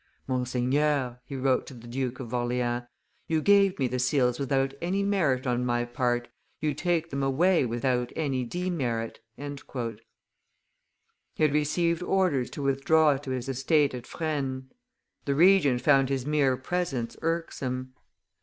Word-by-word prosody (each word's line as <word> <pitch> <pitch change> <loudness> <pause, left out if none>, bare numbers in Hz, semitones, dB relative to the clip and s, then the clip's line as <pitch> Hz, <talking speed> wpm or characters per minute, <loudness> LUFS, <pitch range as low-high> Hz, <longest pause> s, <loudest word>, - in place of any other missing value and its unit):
"Monseigneur," 130 +1 0
he 140 - -7
wrote 130 -1 +1
to 135 - -9
the 120 -1 -12
Duke 125 +1 -3
of 125 -2 -7
Orleans, 120 0 -1 0.4
"you 160 -1 +1
gave 200 +2 +4
me 130 - +1
the 125 +1 -2
seals 125 -1 +2
without 135 -1 0
any 190 +4 0
merit 155 -11 +1
on 125 -1 0
my 120 -1 0
part, 120 0 -1 0.3
you 155 -1 0
take 170 +2 -1
them 140 0 -2
away 140 +3 +3
without 125 +1 -1
any 135 -5 -1
demerit." 125 -7 -2 0.2
He - - -8 2.0
had 150 -2 +3
received 170 +3 +1
orders 180 -9 +1
to 145 - -6
withdraw 140 +2 +3
to 135 0 -9
his 130 0 -3
estate 135 +2 +2
at 125 -1 -7
Fresnes; 135 -5 -3 0.5
the 140 - 0
Regent 160 -7 +5
found 135 0 +4
his 135 -2 -1
mere 145 -4 +2
presence 135 -4 -2
irksome. 130 -6 -3
135 Hz, 145 wpm, -27 LUFS, 125-155 Hz, 2.0 s, Regent